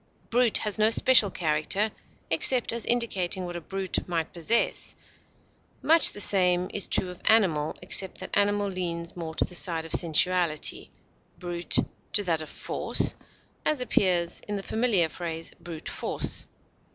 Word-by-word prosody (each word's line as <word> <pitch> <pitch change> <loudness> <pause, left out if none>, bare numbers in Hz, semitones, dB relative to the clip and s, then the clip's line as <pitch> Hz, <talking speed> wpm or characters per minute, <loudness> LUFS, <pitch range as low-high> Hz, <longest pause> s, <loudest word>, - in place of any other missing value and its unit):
Brute 240 -1 +4
has 210 0 -1
no 215 +1 +4
special 230 -2 +4
character, 175 +6 0 0.4
except 235 +10 +3
as 235 -1 -4
indicating 195 -6 0
what 175 0 -7
a 175 - -6
brute 190 +3 -3
might 165 -2 -3
possess; 180 +8 0 0.9
much 330 +1 +6
the - - -7
same 180 -3 +3
is 205 - +1
true 185 - +1
of 180 - -14
animal, 175 -9 +2
except 190 +1 +1
that 185 - -7
animal 205 0 +1
leans 170 -3 -4
more 165 -2 -7
to - - 0
the - - -13
side 165 -2 +2
of 165 - -10
sensuality, 170 -1 +1 0.5
brute 175 -1 -3 0.4
to 205 - +2
that 165 -4 -1
of 155 - -9
force, - - 0 0.5
as 305 -3 0
appears 180 -8 0
in 205 - -3
the 195 - -5
familiar 220 -7 +1
phrase 165 0 -7
"brute 165 -2 -9
force." - - -1
185 Hz, 150 wpm, -26 LUFS, 170-205 Hz, 0.9 s, much